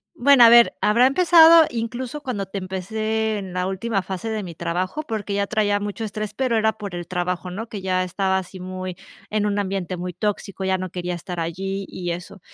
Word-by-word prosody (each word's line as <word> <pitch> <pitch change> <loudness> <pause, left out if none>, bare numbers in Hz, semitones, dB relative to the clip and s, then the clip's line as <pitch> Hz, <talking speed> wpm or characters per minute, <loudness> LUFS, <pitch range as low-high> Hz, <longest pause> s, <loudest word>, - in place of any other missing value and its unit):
Bueno, 270 0 +6
a 230 - +9
ver, 235 0 +7
habrá 235 +4 +4
empezado, 330 +1 +7
incluso, 245 +4 -4
cuando 230 -8 -3
te 195 +1 -5
empecé 215 +4 -2
en 190 -2 -7
la 180 0 -1
última 195 +1 -2
fase 190 +4 -5
de 215 -1 -2
mi 175 -3 -8
trabajo 180 - -2
porque 210 -4 -4
ya 200 0 0
traía 205 -1 +1
mucho 205 +2 -5
estrés, 215 0 -5
pero 255 -2 0
era 220 0 +2
por 205 -4 -8
el 175 -1 -6
trabajo, 180 0 -3
¿no?, 220 +6 -6
que 205 -3 -7
ya 185 -1 +1
estaba 190 +1 0
así 185 0 -8
muy 185 0 -6 0.3
en 210 -1 0
un 205 0 0
ambiente 190 -2 -3
muy 180 +1 -5
tóxico, 200 0 -3
ya 190 0 +2
no 185 -1 -5
quería 180 0 -4
estar 175 +1 -7
allí 195 +4 -3
y 175 -1 -5
eso. 175 +3 -7
195 Hz, 210 wpm, -22 LUFS, 185-220 Hz, 0.3 s, a